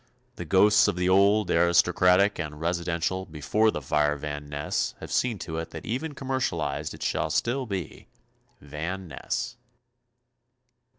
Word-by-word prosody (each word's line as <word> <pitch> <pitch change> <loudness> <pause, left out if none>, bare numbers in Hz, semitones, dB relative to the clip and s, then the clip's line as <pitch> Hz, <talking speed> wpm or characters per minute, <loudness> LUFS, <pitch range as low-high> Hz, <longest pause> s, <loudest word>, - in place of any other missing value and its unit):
The 85 - -5
ghosts 100 +5 +5
of - - 0
the 90 0 0
old, 100 +2 +4
aristocratic 90 +3 +4
and 75 -1 -5
residential 85 +2 -1
before 90 +8 +1
the 75 -9 -3
fire 75 +1 +1
Van 75 0 -6
Ness 75 0 -2
have - - -9
seen 120 -4 +1
to 80 -1 -5
it 80 - -5
that 80 - -9
even 145 +6 -3
commercialized 130 - -2
it - - -8
shall - - 0
still 130 +2 0
be 95 -6 -5 0.5
Van 80 +6 -5
Ness. 120 - -4
90 Hz, 140 wpm, -26 LUFS, 75-105 Hz, 0.5 s, ghosts